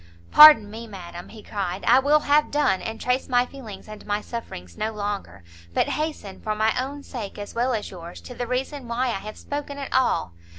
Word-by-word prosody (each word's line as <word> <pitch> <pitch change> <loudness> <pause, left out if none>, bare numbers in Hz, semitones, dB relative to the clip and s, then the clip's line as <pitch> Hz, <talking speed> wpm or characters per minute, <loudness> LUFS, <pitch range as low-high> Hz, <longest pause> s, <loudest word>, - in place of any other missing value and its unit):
"Pardon 295 -9 +9
me, 230 +2 -8
madam," 175 -4 -9
he 220 -2 -12
cried; 195 -2 -4
"I 250 +3 +6
will 295 +3 +3
have 295 +1 +3
done, 290 -10 +1
and 225 0 -5
trace 250 +2 -1
my 245 -1 +3
feelings 235 -8 -10
and 215 -1 -10
my 205 0 -1
sufferings 210 - -8
no 220 +1 -2
longer, 205 - -5 0.3
but - - +2
hasten, 300 -11 -4
for 215 0 -2
my 220 +1 +2
own 280 +2 -7
sake 225 -9 -7
as 205 0 -7
well 245 +1 +1
as 210 - -5
yours, 175 -2 -9
to 250 - -10
the 245 0 -4
reason 260 +1 -3
why 245 +2 0
I 195 -5 -2
have 215 +1 -8
spoken 285 0 -5
at 275 -1 -6
all. 90 - +1
230 Hz, 210 wpm, -24 LUFS, 205-265 Hz, 0.3 s, Pardon